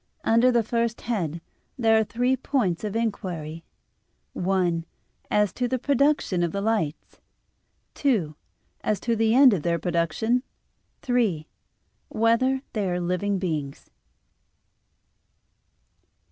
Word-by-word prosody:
Under 230 +3 +4
the 235 -2 +2
first 230 +1 -1
head 170 -9 -2 0.4
there 225 -3 +3
are 220 - +4
three 245 +4 0
points 235 -10 -1
of 210 0 -3
inquiry: 175 -8 -3 0.7
(1) 180 -3 0 0.5
As 210 -2 +2
to 250 - -1
the 255 +1 -1
production 280 -7 +1
of 170 -1 0
the 200 - -3
lights; 200 -8 -2 0.7
(2) 205 - 0 0.5
As 215 - 0
to 235 -1 0
the 225 +1 +2
end 265 -3 +7
of 185 - -1
their 170 +1 0
production; 175 +9 0 0.6
(3) 225 - 0 0.6
Whether 255 +4 +2
they 205 -4 -1
are 180 0 -1
living 180 +3 -1
beings? 155 -7 -4
215 Hz, 120 wpm, -25 LUFS, 175-235 Hz, 0.7 s, end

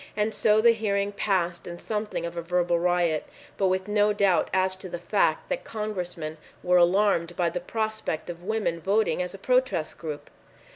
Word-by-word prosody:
And 215 +1 +1
so 215 0 +4
the 235 +1 +7
hearing 205 -3 0
passed 180 -4 -1
in 175 0 -6
something 210 -3 -3
of 170 0 -5
a 170 - -2
verbal 175 0 +1
riot, 175 -3 +1 0.3
but 195 - +1
with 185 +1 0
no 210 0 +3
doubt 200 -3 +2
as 185 0 +1
to 185 0 -8
the 175 - -4
fact 175 - +1
that - - -2
Congressmen 180 -7 -5 0.2
were 180 0 +4
alarmed 175 -1 +3
by 175 -2 +1
the 180 - -2
prospect 215 -4 -3
of 175 -1 -7
women 205 -4 -1
voting 200 +3 +1
as 180 +2 -4
a - - -8
protest 250 -7 0
group. 155 -3 -6
185 Hz, 185 wpm, -26 LUFS, 175-210 Hz, 0.3 s, the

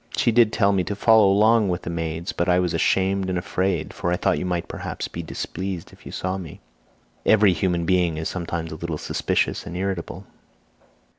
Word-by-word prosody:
She 120 - +3
did 115 -1 +4
tell 100 -3 +3
me 95 -2 +1
to 105 - -3
follow 110 0 +5
along 105 +1 +4
with 90 0 -2
the - - -4
maids, 80 0 -3
but 85 - -1
I 90 - +4
was 90 -2 0
ashamed 95 0 +1
and 90 - -1
afraid, 90 -2 -1
for 85 - -2
I 90 - +1
thought - - +1
you 90 - -3
might 90 -2 -2
perhaps - - -5
be 85 - -6
displeased 90 +2 -5
if - - -15
you - - -7
saw 95 +1 -3
me. 85 -5 -9 0.6
Every 105 -3 +5
human 85 0 0
being 90 -2 +2
is 80 - -2
sometimes 85 -2 -4
a - - -5
little 85 -2 -4
suspicious - - -1
and 85 - -5
irritable." 95 0 -4
90 Hz, 205 wpm, -23 LUFS, 85-100 Hz, 0.6 s, follow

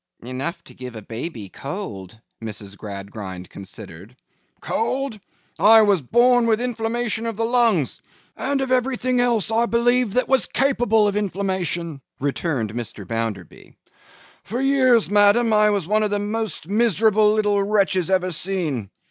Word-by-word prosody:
'Enough 130 +8 -4
to - - -14
give 125 -2 -9
a 110 - -8
baby 115 - -6
cold,' 110 - -7 0.2
Mrs. 105 -2 -5
Gradgrind 100 -2 -8
considered. 100 +2 -10 0.4
'Cold? 255 0 -2 0.4
I 220 +1 +7
was 200 -5 +3
born 240 - +3
with 220 -1 +2
inflammation 230 -1 -2
of 225 -3 -4
the 225 - 0
lungs, 230 - +1 0.3
and 275 0 -1
of 265 -1 -2
everything 255 0 +1
else, 235 -3 +1
I 230 +1 +2
believe, 240 -1 +2
that 250 - +2
was 265 -3 +2
capable 245 -5 +2
of 205 - -1
inflammation,' 185 -6 -2 0.2
returned 135 -5 -2
Mr. 110 -4 -6
Bounderby. 115 -6 -5 0.7
'For 235 +5 -4
years, 260 -5 +3
ma'am, 210 +3 +4
I 210 0 +5
was 200 -5 0
one 215 +4 +1
of 210 - +1
the 205 - 0
most 210 -5 -3
miserable 215 0 +3
little 210 -2 +1
wretches 195 -3 +1
ever 185 -1 +1
seen. 160 - -2
205 Hz, 145 wpm, -22 LUFS, -, 0.7 s, I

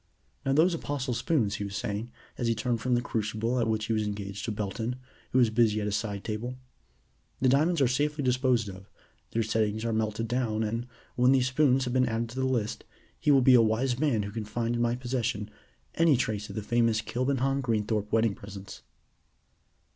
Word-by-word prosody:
"Now 135 -1 +1
those 165 +5 +4
Apostle 145 -5 -2
spoons," 120 -4 0
he 100 - -3
was 100 -1 -5
saying, 105 +3 -3 0.3
as 120 - -2
he 115 - +2
turned 115 +1 -1
from 125 0 +1
the 120 - 0
crucible 110 +2 -1
at 115 - +1
which 110 -1 0
he 115 - -1
was 110 - +1
engaged 100 -1 -4
to 115 - -2
Belton, 110 +3 -3 0.4
who - - +2
was 120 -4 +4
busy 110 -2 +3
at 105 - -2
a 105 - -1
side 100 -1 -2
table. 115 +4 -4 0.8
"The 130 - +3
diamonds 155 +4 +3
are 135 - +5
safely 145 +4 0
disposed 125 -3 +2
of, 95 0 -10 0.4
their 115 - 0
settings 110 0 0
are 115 - 0
melted 110 +1 -1
down, 115 -2 0
and, 115 +3 -2 0.3
when 125 +2 +4
these 130 -1 +3
spoons 135 -1 +3
have 125 -1 -3
been 130 -1 +3
added 115 +1 -2
to 125 +3 -6
the 130 - +1
list, 115 -5 -1 0.4
he - - 0
will 135 -3 +6
be 130 - +7
a 120 - +8
wise 120 +3 +1
man 135 -9 +2
who 100 - -5
can 110 +1 -4
find 115 +2 -2
in 120 - -1
my 120 0 +2
possession 120 -4 -2 0.4
any 165 -5 +4
trace 105 -4 -2
of - - -8
the 110 - -3
famous 115 0 +2
Kilbenham 135 +3 0
Greenthorpe 105 -3 -1
wedding 115 -1 +3
presents." 100 -1 -10
115 Hz, 210 wpm, -28 LUFS, 110-130 Hz, 0.8 s, a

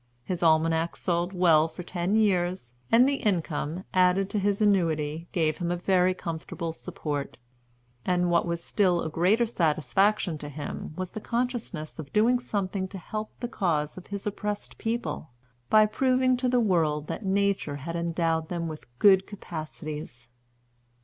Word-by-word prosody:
His 180 +5 -3
Almanacs 160 0 +2
sold 175 0 0
well 165 -4 +4
for 170 +2 -9
ten 180 +3 -1
years, 180 - +1 0.2
and 240 +3 +6
the 280 0 +1
income, 175 - -1
added 185 +1 +3
to 210 - 0
his 200 0 +1
annuity, 165 -6 +1
gave 155 -3 +1
him 175 -1 -1
a 175 - +1
very 185 0 +2
comfortable 165 -1 -5
support; 145 -3 -5 0.7
and 180 -1 +1
what 170 0 +3
was 170 0 -2
a - - -15
still 180 -5 +2
greater 185 +9 +3
satisfaction 185 -1 +1
to 145 - -7
him 145 +1 -6
was 185 0 -4
the 215 - -6
consciousness 230 - -3
of 140 -3 -7
doing 235 +4 +4
something 195 -5 -2
to 195 - -8
help 215 +5 -6
the 240 - -1
cause 165 -10 -1
of 185 - -11
his 200 -1 -6
oppressed 210 0 -4
people, 225 -8 -3 0.4
by 215 0 +7
proving 255 +3 +2
to 250 0 0
the 250 0 +3
world 160 -8 +1
that - - -5
Nature 195 -6 +1
had 160 +4 -5
endowed 165 -1 0
them 170 -2 -2
with 155 -4 -8
good 190 +4 +5
capacities. 155 - -7
180 Hz, 160 wpm, -27 LUFS, 160-205 Hz, 0.7 s, by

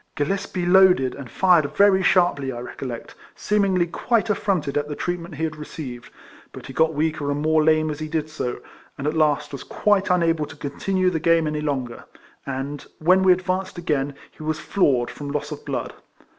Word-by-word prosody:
Gillespie 185 +3 -2
loaded, 180 -8 +5
and 135 -3 -9
fired 175 -6 +3
very 200 -1 +5
sharply, 175 -8 +2
I 120 - -6
recollect; 125 0 -7 0.2
seemingly 195 -4 +1
quite 225 +5 0
affronted 185 -9 -1
at 145 0 0
the 150 - -5
treatment 175 -1 -4
he 160 - -4
had 155 -1 -2
received; 135 -5 -8 0.4
but - - -10
he 135 - -9
got 160 +3 +2
weaker 155 -1 -1
and 145 0 -1
more 155 0 +3
lame 155 0 +3
as 150 - -6
he 155 - -4
did 155 -1 -2
so, 150 -5 -4 0.4
and 140 - -5
at 150 - +1
last 155 -2 +1
was 140 - -7
quite 205 -2 +1
unable 165 -4 +2
to - - -11
continue 185 +6 -1
the 165 - -1
game 165 0 +3
any 150 0 -2
longer; 130 -5 -3 0.4
and, 135 +2 -5
when 185 +4 +4
we 190 -1 +5
advanced 185 +1 -1
again, 145 -5 -1 0.2
he - - -16
was 155 0 -2
floored 135 -11 +1
from 145 -1 -7
loss 150 +1 -3
of 150 - -7
blood. - - -3
155 Hz, 190 wpm, -23 LUFS, 145-180 Hz, 0.4 s, loaded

